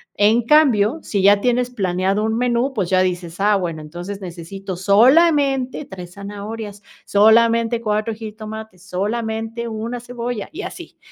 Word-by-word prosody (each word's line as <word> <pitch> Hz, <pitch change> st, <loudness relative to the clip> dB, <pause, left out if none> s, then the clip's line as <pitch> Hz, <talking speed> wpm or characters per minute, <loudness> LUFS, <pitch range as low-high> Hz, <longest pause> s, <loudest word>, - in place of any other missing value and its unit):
En 220 Hz, +3 st, +3 dB
cambio, 275 Hz, -3 st, +4 dB
si 200 Hz, -3 st, -2 dB
ya 200 Hz, 0 st, +5 dB
tienes 245 Hz, +1 st, +1 dB
planeado 195 Hz, -1 st, 0 dB
un 220 Hz, +1 st, 0 dB
menú, 245 Hz, +2 st, +1 dB
pues 195 Hz, -7 st, -2 dB
ya 185 Hz, 0 st, +4 dB
dices: 180 Hz, -1 st, -3 dB
"Ah, 205 Hz, +1 st, +3 dB
bueno, 170 Hz, -5 st, -3 dB
entonces 175 Hz, +6 st, -7 dB
necesito 185 Hz, +2 st, -7 dB
solamente 270 Hz, -, +3 dB
3 180 Hz, -4 st, -10 dB
zanahorias, 205 Hz, +1 st, -7 dB, 0.2 s
solamente 230 Hz, +2 st, +4 dB
4 215 Hz, 0 st, -1 dB
jitomates, 215 Hz, -3 st, -9 dB
solamente 225 Hz, +4 st, -3 dB
1 230 Hz, +2 st, -4 dB
cebolla 245 Hz, -2 st, -5 dB
y 315 Hz, -, -6 dB
así". -, -, -9 dB
215 Hz, 140 wpm, -20 LUFS, 195-235 Hz, 0.2 s, ya